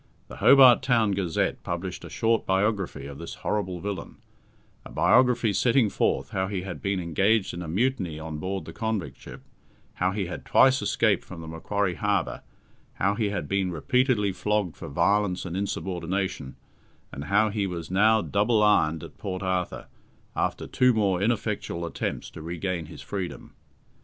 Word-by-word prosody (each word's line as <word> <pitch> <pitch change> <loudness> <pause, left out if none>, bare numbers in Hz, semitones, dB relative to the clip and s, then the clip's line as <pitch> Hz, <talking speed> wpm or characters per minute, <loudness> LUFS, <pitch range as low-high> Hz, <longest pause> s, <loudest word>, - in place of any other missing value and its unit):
The - - -9
Hobart 130 -3 +7
Town 115 -5 +2
Gazette 95 -4 -1
published 90 +1 -5
a - - -8
short 115 0 +1
biography 95 -5 0
of 70 0 -8
this - - -7
horrible 95 -4 -1
villain 100 -1 -5 0.7
a - - -11
biography 125 -4 +3
setting 115 +3 +3
forth - - 0
how 95 0 -1
he 95 -2 -3
had 95 -2 -7
been 100 -1 -1
engaged 95 +5 +1
in 85 - -5
a 85 - -6
mutiny 95 -3 -1
on 80 -1 -6
board 95 +3 -3
the - - -9
convict 110 -5 -3
ship, - - -11 0.5
how 90 +1 0
he 100 0 -2
had 90 - -6
twice 130 +1 +4
escaped 110 -3 +2
from 90 -3 -10
the 80 - -9
Macquarie 90 +4 -1
Harbour, 100 -2 -1 0.5
how 100 +2 +1
he 105 0 0
had 105 - -3
been 95 -1 0
repeatedly 120 - +1
flogged 105 -4 -1
for - - -8
violence 95 +5 +1
and 90 -1 -5
insubordination, 95 -6 -3 0.6
and 70 +2 -7
how 105 +4 +3
he 100 -2 -1
was 85 -2 -6
now 110 +3 +4
double 105 +2 +2
ironed 80 -7 +3
at - - -12
Port 95 0 -4
Arthur, 95 -1 -2 0.5
after - - -1
two 125 -1 +3
more 95 -4 +1
ineffectual 105 -6 -1
attempts 85 - -4
to - - -10
regain 85 0 -3
his - - -10
freedom. 95 -3 -6
95 Hz, 165 wpm, -26 LUFS, 90-105 Hz, 0.7 s, Hobart